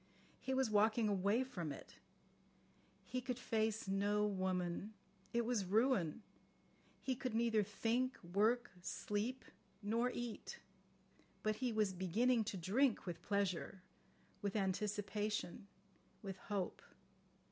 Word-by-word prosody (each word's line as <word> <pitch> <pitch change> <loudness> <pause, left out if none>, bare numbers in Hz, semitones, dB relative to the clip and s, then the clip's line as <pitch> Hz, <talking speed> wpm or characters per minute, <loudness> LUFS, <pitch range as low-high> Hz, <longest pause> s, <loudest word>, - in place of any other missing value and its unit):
He 265 - -1
was 260 -4 +2
walking 215 +2 +4
away 200 +4 +3
from 180 - -4
it. 140 - -9 1.1
He 255 - -2
could 250 -1 -2
face 220 -3 0
no 205 +2 +2
woman. 185 0 -1 0.4
It 235 0 +1
was 235 -4 +1
ruin. 210 - +2 0.8
He 265 - 0
could 250 -2 -3
neither 230 -2 +3
think, 230 +5 0
work, 215 +8 +2
sleep, 210 +7 -2 0.4
nor 230 +4 +2
eat. 240 -2 -5 0.9
But 215 0 +1
he 250 +1 0
was 215 -3 +2
beginning 220 +6 +2
to 205 -2 -3
drink 215 +8 +2
with 175 -3 -4
pleasure, 195 -2 -1 0.6
with 200 -1 -1
anticipation, 205 0 -1 0.6
with 195 -2 -5
hope. 195 -2 -3
210 Hz, 115 wpm, -39 LUFS, 195-235 Hz, 1.1 s, walking